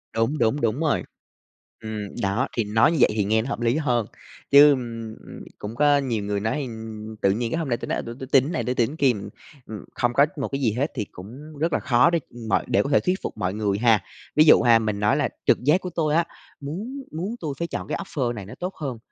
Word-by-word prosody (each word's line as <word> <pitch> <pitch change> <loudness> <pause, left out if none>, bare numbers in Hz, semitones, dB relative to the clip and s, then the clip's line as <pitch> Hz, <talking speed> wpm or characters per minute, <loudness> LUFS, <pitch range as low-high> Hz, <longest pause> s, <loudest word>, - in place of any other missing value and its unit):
Đúng, 115 +7 +1
đúng, 120 +4 +1
đúng 115 +4 0
rồi. 160 -3 +1 0.8
Ừm, 105 -2 -6
đó 100 +7 0
thì 115 - +2
nói 110 +7 +3
như 165 - 0
vậy - - +6
thì 105 - +1
nghe 110 +2 +2
nó 120 - -5
hợp - - -3
lý 120 +4 +2
hơn, 125 -7 +1 0.5
chứ, 145 +1 +9
ưm, 115 -4 -4
ưm, - - -10
cũng 105 +2 -7
có 145 +1 +4
nhiều 120 -7 -1
người 100 0 -1
nói, 110 +9 -1
ừm, 110 -3 -7
tự 100 - +4
nhiên 115 +3 -2
cái - - -1
hôm 155 - -3
nay 120 - +1
tôi - - -7
nói: - - -1
"À, - - -2
tui 115 0 -7
tui 130 - -6
tin 135 -1 +5
cái 155 - -4
này, 165 - -1
tui 125 - -1
tin 125 +5 0
kia." 140 -4 +3
Ừm, 100 -3 -7 0.4
ừm, 105 -3 -8
không 120 -1 0
có 140 +4 +5
một 135 - -2
cái 140 0 -3
gì 115 -5 +2
hết 140 +6 -1
thì 105 - -2
cũng 135 +11 -11
rất 165 0 0
là - - +2
khó 125 +3 +4
để, 170 - +1
ừm, 120 -2 -10
mọi - - +1
để 100 - +2
có - - -4
thể 140 - +4
thuyết 185 +1 -1
phục - - -5
mọi 95 -2 -1
người 105 -2 -1
ha. 115 -3 +4 0.3
Ví 155 +1 +6
dụ 155 - +7
ha, 115 -1 +5
mình 105 -2 -2
nói 105 +1 +2
là - - +1 0.2
trực - - +3
giác 155 +8 +3
của 180 - -5
tôi 155 -3 0
á, 170 - +3 0.3
muốn 210 - -6
muốn 185 +9 -4
tui 155 -4 -3
phải 170 - -1
chọn - - -5
cái - - -2
offer 125 -5 -2
này 105 -5 -7
nó 100 - -10
tốt 180 +2 -4
hơn, 135 -6 -5
120 Hz, 275 wpm, -24 LUFS, 110-150 Hz, 0.8 s, chứ